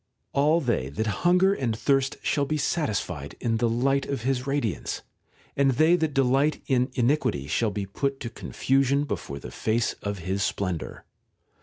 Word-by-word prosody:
All 150 +4 +3
they 120 - 0
that 95 +11 -2 0.2
hunger 180 +2 +4
and 120 - -1
thirst 135 +2 +1
shall 145 -2 +1
be 155 - 0
satisfied 150 -7 -2
in 115 -1 0
the 120 +1 +1
light 135 +4 +1
of 135 -5 -3
his 130 0 -1
radiance, 135 - -2 0.5
and 135 -1 +3
they 160 +7 +5
that 160 -4 -1
delight 135 +3 +3
in 125 -1 +2
iniquity 120 - +1
shall 105 +10 +1
be 100 -1 -3
put 135 +7 -2
to 115 - -5
confusion 135 +3 +1
before 70 - -4
the - - -9
face 110 +1 0
of 100 0 -3
his 95 +3 -2
splendour. 90 -4 -3
130 Hz, 165 wpm, -26 LUFS, 110-140 Hz, 0.5 s, they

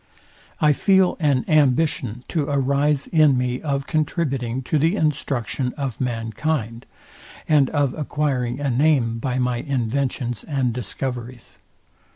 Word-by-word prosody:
I 150 -1 +4
feel 190 +3 +3
an 140 -6 +1
ambition 140 -5 +1
to 155 -4 0
arise 140 +1 +1
in 155 -5 +4
me 125 0 -1
of 140 -2 -2
contributing 135 -6 -1
to 150 +4 0
the 165 +6 +2
instruction 135 - -1
of 135 -5 -4
mankind, 115 +1 -2 0.6
and 145 -4 +4
of 145 -4 0
acquiring 140 -5 -2
a 140 -2 -1
name 125 -4 +2
by 125 +1 -2
my 125 -1 0
inventions 125 -2 -2
and 135 -6 -1
discoveries. 125 0 -6
135 Hz, 125 wpm, -22 LUFS, 125-150 Hz, 0.6 s, I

